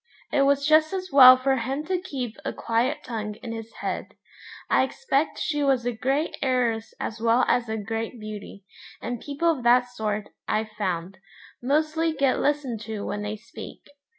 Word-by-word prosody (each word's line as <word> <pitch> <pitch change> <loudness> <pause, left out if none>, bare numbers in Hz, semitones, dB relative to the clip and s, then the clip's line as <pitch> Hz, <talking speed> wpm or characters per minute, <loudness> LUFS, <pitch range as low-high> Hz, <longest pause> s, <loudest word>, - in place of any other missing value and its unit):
It 280 - +3
was 280 0 +3
just 310 +2 +4
as 370 -1 -4
well 255 -2 +10
for 265 +1 +1
him 270 +5 -3
to 365 +2 0
keep 260 -10 -5
a - - -2
quiet 240 +6 0
tongue 215 -3 -4
in 230 - -5
his 225 0 -7
head. - - -4 0.5
I - - +4
expect 270 +2 0
she 295 -2 -1
was 270 -4 +2
a 245 - +1
great 270 +7 -1
heiress 245 -4 0
as 220 +1 -4
well 230 +2 +4
as 240 -2 +1
a 220 - -1
great 225 +3 -4
beauty, 210 -2 -8 0.3
and 240 -1 -5
people 295 +4 +1
of 295 -6 -3
that 245 +1 +4
sort, 215 -3 -3 0.2
I've 215 0 0
found, 185 -3 -3 0.4
mostly 310 +5 +1
get 275 -3 +1
listened 280 -6 0
to 215 -2 -5
when 205 - -3
they 210 +1 -3
speak. 215 - -11
245 Hz, 180 wpm, -25 LUFS, 220-280 Hz, 0.5 s, well